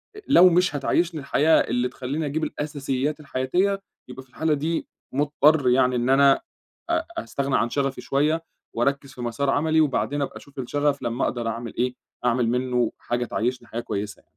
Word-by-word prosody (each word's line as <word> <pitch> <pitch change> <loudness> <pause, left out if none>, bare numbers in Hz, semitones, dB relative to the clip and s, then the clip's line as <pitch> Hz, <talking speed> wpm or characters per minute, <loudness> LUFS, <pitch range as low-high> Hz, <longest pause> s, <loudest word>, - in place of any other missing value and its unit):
أ - - -8
لو 185 -9 +7
مش 180 -3 +2
هتعيّشني 160 +4 0
الحياة 155 +3 +3
اللي 125 +1 0
تخلّيني 135 +5 -4
أجيب 150 +2 -2
الأساسيات 145 -1 -2
الحياتية، 165 +8 0 0.3
يبقى 125 +1 -9
في 130 - -28
الحالة 160 +4 0
دي 160 +3 -2 0.2
مضطر 145 0 +3
يعني 125 0 +3
إن 120 +1 0
أنا 135 +1 +5 0.5
أ 335 -1 +1
أستغنى 140 - -1
عن 120 - +1
شغفي 135 -1 -1
شوية 150 +6 +1 0.3
وأركّز 140 +3 -1
في 125 - -9
مَسار 120 +4 -1
عملي 160 +3 +3
وبعدين 145 0 0
أبقى 140 - -3
أشوف 140 -1 -13
الشغف 145 +2 0
لمّا 120 +2 -1
أقدر 120 -2 -1
أعمل 115 0 -4
إيه، 125 +1 0 0.3
أعمل 125 -1 +2
منّه 125 -1 0
حاجة 120 0 -2
تعيّشني 120 +1 -2
حاجة 115 - -4
كويسة. 100 -3 -5
140 Hz, 170 wpm, -24 LUFS, 125-150 Hz, 0.5 s, لو